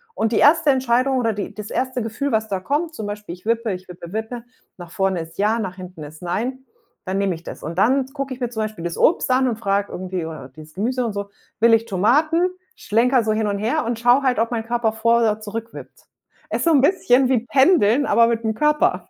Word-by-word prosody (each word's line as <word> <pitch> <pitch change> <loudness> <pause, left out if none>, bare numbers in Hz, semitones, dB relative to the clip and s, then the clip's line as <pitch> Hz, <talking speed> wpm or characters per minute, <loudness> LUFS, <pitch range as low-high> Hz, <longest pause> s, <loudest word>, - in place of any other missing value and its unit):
und 225 +1 0
die - - +2
1. 310 +1 +5
Entscheidung 260 +1 +1
oder 230 -2 +1
die 200 -1 -5
das 210 -1 -8
1. 255 -1 -2
Gefühl, 230 +6 -3
was 220 0 0
da 190 -2 -1
kommt, 300 - -2
zum 215 - -5
Beispiel 205 -4 -6
ich 180 - -23
wippe 230 -1 0
ich 185 0 -6
wippe 175 -1 -10
wippe, 220 +2 -4 0.3
nach 175 -2 -11
vorne 190 -2 0
ist 165 0 -11
ja, 215 +3 +1
nach 190 -4 -4
hinten 180 -4 -10
ist 155 +3 -11
nein. 250 +9 -3 0.4
Dann 185 +1 -2
nehme 195 -3 0
ich 165 - -13
das. - - -9
Und 165 +3 -6
dann 260 +6 +3
gucke 270 -1 -5
ich 255 - -10
mir 245 - -1
zum 220 -2 -3
Beispiel 215 -5 -6
das 170 -1 -4
Obst 315 -5 +2
an 260 +1 +3
und 235 - -1
frage 200 -2 0
irgendwie 185 -2 -4
oder 155 -5 -8
dieses 155 +3 -14
Gemüse 245 +5 -1
und 220 - -3
so 200 0 -5 0.3
„Will 235 0 +6
ich 225 0 +3
Tomaten“, 295 - +2 0.3
schlenkere 245 +3 +2
so 215 - 0
hin 215 0 0
und 200 -1 -2
her 245 +9 0
und 235 0 -2
schaue 245 +3 +4
halt, 255 -3 +1
ob 230 +1 0
mein 225 -2 -2
Körper 235 -1 0
vor 230 +1 +2
oder 215 -1 +1
zurückwippt. 225 +2 -8 0.5
Ist - - -1
so 335 - +4
'n 280 -4 +5
bisschen 270 -6 +3
wie 245 -3 +1
pendeln, 275 - +4
aber 230 0 +4
mit 230 -1 -1
dem 220 - 0
Körper. 300 +3 +1
225 Hz, 240 wpm, -21 LUFS, 200-255 Hz, 0.5 s, Will